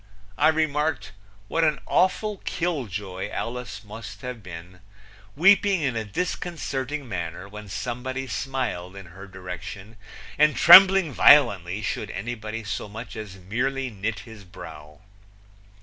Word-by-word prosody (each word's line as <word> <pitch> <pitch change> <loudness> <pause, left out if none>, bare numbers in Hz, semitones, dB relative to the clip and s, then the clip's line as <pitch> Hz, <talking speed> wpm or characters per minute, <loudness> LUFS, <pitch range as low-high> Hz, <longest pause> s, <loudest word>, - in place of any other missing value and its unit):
I 150 - +3
remarked, 155 -1 0 0.4
what 165 +8 0
an 155 -2 +2
awful 200 +3 +1
kill 165 -8 -2
joy 95 0 -5
Alice 115 -2 -5
must 105 -1 -10
have 125 -3 -6
been, 90 -1 -10 0.6
weeping 195 +2 +4
in 130 -4 0
a 110 - -1
disconcerting 145 - -4
manner 90 -2 -5
when 105 0 -10
somebody 125 +5 -4
smiled 115 -6 -4
in 100 -1 -9
her 95 +2 -11
direction 95 +3 -9 0.4
and 150 -2 +5
trembling 185 +1 +8
violently 105 -10 +5
should - - -3
anybody 110 +2 -5
so 105 0 -5
much 115 +4 -8
as 105 -3 -7
merely 125 +8 -2
knit 105 0 -4
his 110 -3 -12
brow! 75 -3 -12
115 Hz, 130 wpm, -25 LUFS, 95-145 Hz, 0.6 s, trembling